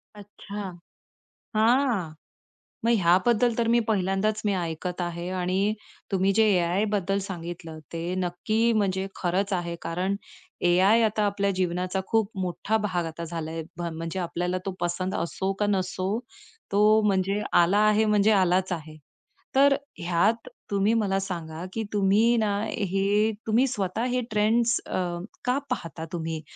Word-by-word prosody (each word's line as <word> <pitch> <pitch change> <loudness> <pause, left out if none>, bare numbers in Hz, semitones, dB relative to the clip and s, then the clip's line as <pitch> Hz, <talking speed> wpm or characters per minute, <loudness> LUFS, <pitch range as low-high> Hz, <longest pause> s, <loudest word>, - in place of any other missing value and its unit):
अच्छा. 200 -2 -8 0.8
हां. 225 - +2 0.7
मग 235 - +4
ह्याबद्दल 210 +6 +3
तर 230 -1 +1
मी 240 - +5
पहिल्यांदाच 205 +1 +1
मी 205 - +2
ऐकत 175 +1 -3
आहे, 175 +1 -4
आणि 185 +3 0 0.4
तुम्ही 195 0 +2
जे - - +7
एआयबद्दल 195 +2 +1
सांगितलं, 170 -3 -7
ते 170 +2 -3
नक्की 215 +6 0
म्हणजे 195 -2 0
खरंच 190 +3 0
आहे, 170 -1 -2
कारण 180 +4 -1 0.5
एआय 195 +6 +5
आता 215 -1 +1
आपल्या 200 -1 +1
जीवनाचा 185 +1 -1
खूप 220 -2 +1
मोठा 185 +4 -1
भाग 175 -4 -1
आता 165 +1 -6
झालाय. 165 -1 -4
ब - - -5
म्हणजे 165 +3 -4
आपल्याला 180 +1 -2
तो 195 - -1
पसंद 175 +2 -2
असो 190 +3 -2
का 205 - +2
नसो, 190 +1 -1 0.5
तो 210 +2 +5
म्हणजे 195 +1 +1
आला 175 +4 +5
आहे 215 +1 +4
म्हणजे 210 0 +4
आलाच 185 -1 +3
आहे. 155 -2 -7 0.6
तर 280 +1 +6 0.2
ह्यात 180 +6 +1 0.2
तुम्ही 200 +3 +2
मला 200 -4 +1
सांगा, 170 -3 -5
की 225 - -2
तुम्ही 210 +4 +4
ना, 215 -2 +1 0.2
हे 200 +1 +1 0.2
तुम्ही 230 +5 +4
स्वतः 210 -3 -2
हे 250 0 +1
ट्रेंड्स, 225 +3 +2
अ, - - -10 0.5
का 250 +2 +2
पाहता 165 -1 -4
तुम्ही? 160 -1 -3
195 Hz, 140 wpm, -26 LUFS, 175-210 Hz, 0.8 s, जे